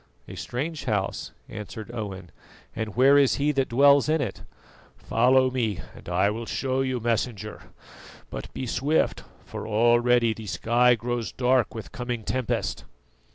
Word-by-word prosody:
"A - - -9
strange 150 +6 -4
house," 105 -5 -2 0.2
answered 105 +1 -8
Owen, 95 -7 -6 0.4
"and 110 -2 -4
where 135 +3 +6
is 140 -2 +4
he 145 +2 +1
that 135 -2 0
dwells 140 +4 +5
in 160 +1 +2
it?" 140 - -3 0.6
"Follow 130 +2 +3
me 115 -7 -1
and - - -11
I 95 +3 +2
will 115 +2 -5
show 130 0 -1
you, 130 -2 -1
Messenger; 115 -2 -2 0.7
but - - -7
be 130 - -5
swift, 145 +6 0 0.2
for - - -7
already 120 +1 +3
the 110 -1 -9
sky 120 +5 +3
grows 120 0 -3
dark 125 -2 +1
with 110 - -7
coming 120 -2 -4
tempest." 125 - -2
120 Hz, 150 wpm, -26 LUFS, 110-130 Hz, 0.7 s, where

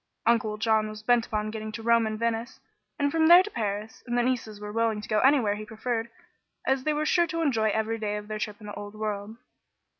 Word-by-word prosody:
Uncle 220 -2 +2
John 220 -1 +2
was 215 0 -9
bent 240 0 +3
upon 215 0 -2
getting 215 0 -5
to 225 - -6
Rome 230 -1 +4
and 215 0 -3
Venice, 230 +1 -2 0.4
and 285 -2 +1
from 320 0 +3
there 350 +2 +9
to 420 - -7
Paris, 210 - -4
and 240 0 -1
the 240 - +3
nieces 235 -4 -2
were 210 0 -6
willing 225 -1 0
to 210 - -8
go 215 - +2
anywhere 260 -6 +4
he 210 +1 -6
preferred, 225 +2 -3 0.6
as 265 -1 +1
they 305 - +2
were 305 +1 0
sure 345 +2 +3
to 330 +1 -2
enjoy 225 -7 +2
every 220 +2 -1
day 210 -1 -2
of 210 0 -8
their 215 0 -4
trip 210 -1 -4
in 215 - -12
the 205 - -7
old 205 +1 -8
world. 215 0 -4
220 Hz, 240 wpm, -27 LUFS, 215-240 Hz, 0.6 s, there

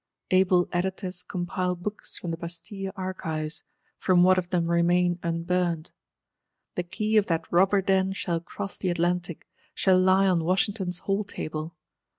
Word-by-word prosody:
_ - - +4
Able 185 -1 +4
Editors 185 0 -2
compile 180 0 -2
Books 205 +4 -5
from 175 - -4
the 165 - -3
Bastille 190 +4 -6
Archives; 160 -5 -3 0.4
from 180 -2 +4
what 185 0 +5
of 175 -1 -5
them 175 -2 +1
remain 175 +1 +3
unburnt. 170 -1 -1 0.8
The - - -1
Key 215 +5 0
of 210 - +4
that 165 -2 0
Robber 190 +3 +4
Den 190 0 +2
shall 170 -3 -1
cross 195 +3 -7
the 185 - -1
Atlantic; 175 0 -1 0.3
shall 185 -1 +4
lie 190 +1 +4
on 180 -4 +2
Washington's 185 +1 0
hall 195 +3 -1
table. 155 -4 -5
180 Hz, 155 wpm, -27 LUFS, 170-190 Hz, 0.8 s, what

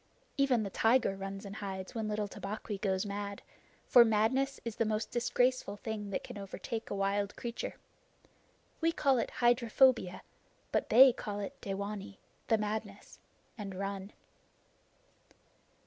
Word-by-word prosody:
Even 270 -5 +3
the 200 - -4
tiger 225 -2 +3
runs 195 +1 -6
and 200 +1 -7
hides 190 -2 -5
when 220 -2 -2
little 210 -1 -1
Tabaqui 205 0 -5
goes 190 0 0
mad, 200 0 -5 0.4
for 245 - +8
madness 235 +5 +1
is 230 -2 -4
the - - +3
most 215 0 -1
disgraceful 245 -3 +1
thing 210 -1 -5
that 195 - -3
can - - -8
overtake 220 +3 -5
a - - -2
wild 200 +1 0
creature. 235 -1 -5 1.0
We 330 +1 +2
call 275 -5 +2
it 230 - -1
hydrophobia, 240 -4 +3 0.5
but - - 0
they 255 +2 +9
call 205 -3 -5
it 200 - -6
dewanee 200 0 -5 0.3
the 225 - +4
madness 210 -1 -5 0.4
and 195 -2 -5
run. 195 +1 -4
210 Hz, 140 wpm, -32 LUFS, 200-235 Hz, 1.0 s, they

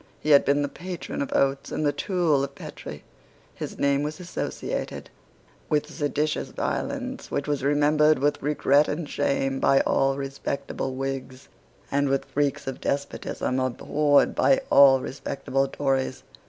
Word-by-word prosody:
He 155 - -1
had 140 - +7
been 145 +1 +2
the - - 0
patron 180 +4 -6
of 140 - -3
Oates 135 0 +1
and 155 - -1
the 145 - +3
tool 165 -6 +1
of 140 0 -5
Petre. - - -9 0.5
His - - -7
name 140 0 +2
was 150 +4 -4
associated 180 -1 -4 0.6
with 150 -1 +2
seditious 150 0 -1
violence 265 -1 -3
which 145 - -2
was 145 -2 -1
remembered 150 +2 +4
with 145 +2 0
regret 145 0 +3
and 155 +1 -3
shame 135 -2 0
by 135 - +4
all 135 0 +1
respectable 135 -1 -4
Whigs, 135 0 -5 0.4
and 140 0 +1
with 135 0 0
freaks 145 -1 -1
of 135 -1 -5
despotism 140 -2 -2
abhorred 145 +3 +2
by 270 0 +3
all 135 -2 +7
respectable 135 0 -2
Tories. 135 -2 -1
140 Hz, 145 wpm, -25 LUFS, 135-150 Hz, 0.6 s, had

